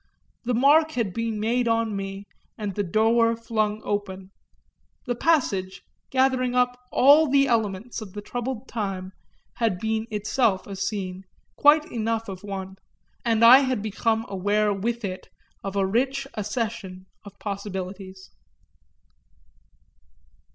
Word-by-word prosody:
The 245 Hz, 0 st, 0 dB
mark 305 Hz, +5 st, +4 dB
had 220 Hz, -7 st, -1 dB
been 230 Hz, -1 st, -2 dB
made 235 Hz, +3 st, +1 dB
for 230 Hz, 0 st, +2 dB
me 195 Hz, -2 st, -5 dB, 0.3 s
and 205 Hz, -2 st, -4 dB
the 205 Hz, -, -1 dB
door 225 Hz, +4 st, +3 dB
flung 215 Hz, -2 st, -1 dB
open; 195 Hz, -2 st, -4 dB, 0.7 s
the 245 Hz, -, -1 dB
passage, 200 Hz, -, 0 dB, 0.3 s
gathering 260 Hz, -1 st, +1 dB
up 250 Hz, 0 st, +2 dB, 0.2 s
all 290 Hz, +4 st, +6 dB
the 275 Hz, 0 st, +4 dB
elements 225 Hz, -1 st, -1 dB
of 200 Hz, -4 st, -9 dB
the 205 Hz, -, -6 dB
troubled 245 Hz, +1 st, -4 dB
time, 195 Hz, -4 st, -4 dB, 0.5 s
had 225 Hz, -6 st, +1 dB
been 220 Hz, +1 st, -1 dB
itself 210 Hz, -1 st, 0 dB
a 200 Hz, -, -7 dB
scene, 190 Hz, -1 st, -4 dB, 0.3 s
quite 300 Hz, +1 st, +5 dB
enough 225 Hz, 0 st, -2 dB
of 190 Hz, 0 st, -8 dB
one, 190 Hz, -1 st, -6 dB, 0.5 s
and 230 Hz, -1 st, +3 dB
I 250 Hz, +3 st, +10 dB
had 255 Hz, -6 st, -1 dB
become 220 Hz, +1 st, 0 dB
aware 205 Hz, +2 st, +1 dB
with 230 Hz, +3 st, -2 dB
it 185 Hz, -1 st, -6 dB, 0.3 s
of 195 Hz, 0 st, -5 dB
a 195 Hz, -1 st, +2 dB
rich 265 Hz, +7 st, 0 dB
accession 210 Hz, -3 st, -4 dB, 0.2 s
of 200 Hz, -1 st, -13 dB
possibilities. 190 Hz, -1 st, -6 dB
220 Hz, 130 wpm, -25 LUFS, 195-240 Hz, 0.7 s, I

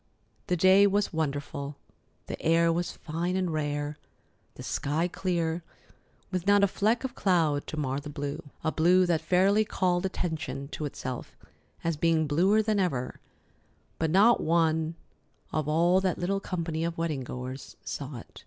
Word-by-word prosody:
The 180 Hz, -, +1 dB
day 190 Hz, +4 st, +6 dB
was 200 Hz, -1 st, 0 dB
wonderful. 145 Hz, -2 st, -3 dB, 0.5 s
The -, -, -6 dB
air 165 Hz, +1 st, +3 dB
was 175 Hz, +1 st, -1 dB
fine 170 Hz, +3 st, -3 dB
and 185 Hz, -3 st, 0 dB
rare, 145 Hz, -1 st, -2 dB, 0.6 s
the -, -, -9 dB
sky 155 Hz, +5 st, -1 dB
clear, 170 Hz, -2 st, -1 dB, 0.7 s
with 185 Hz, 0 st, -2 dB
not 205 Hz, 0 st, +5 dB
a -, -, +6 dB
fleck 220 Hz, +5 st, +1 dB
of 260 Hz, -2 st, -3 dB
cloud 160 Hz, -7 st, +1 dB
to 155 Hz, -, -5 dB
mar 135 Hz, -2 st, -1 dB
the 145 Hz, +1 st, -8 dB
blue—a 145 Hz, +2 st, -4 dB
blue 180 Hz, +4 st, +4 dB
that 170 Hz, -3 st, +1 dB
fairly 195 Hz, +4 st, +3 dB
called 180 Hz, -4 st, 0 dB
attention 160 Hz, -6 st, -3 dB
to 155 Hz, -, -4 dB
itself 130 Hz, -3 st, -6 dB, 0.5 s
as 165 Hz, -2 st, 0 dB
being 160 Hz, 0 st, +2 dB
bluer 185 Hz, +9 st, +3 dB
than 215 Hz, -1 st, +1 dB
ever 135 Hz, -10 st, 0 dB
before. -, -, -38 dB
But 160 Hz, -, +1 dB
not 205 Hz, +8 st, +5 dB
one 160 Hz, 0 st, +1 dB, 0.6 s
of 155 Hz, -2 st, -1 dB
all 170 Hz, +4 st, +4 dB
that 185 Hz, -2 st, 0 dB
little 195 Hz, +3 st, 0 dB
company 165 Hz, -4 st, -3 dB
of 170 Hz, 0 st, -2 dB
wedding 160 Hz, -5 st, -1 dB
goers 125 Hz, +2 st, -7 dB
saw 140 Hz, -2 st, -5 dB
it. -, -, -12 dB
165 Hz, 160 wpm, -28 LUFS, 150-185 Hz, 0.7 s, day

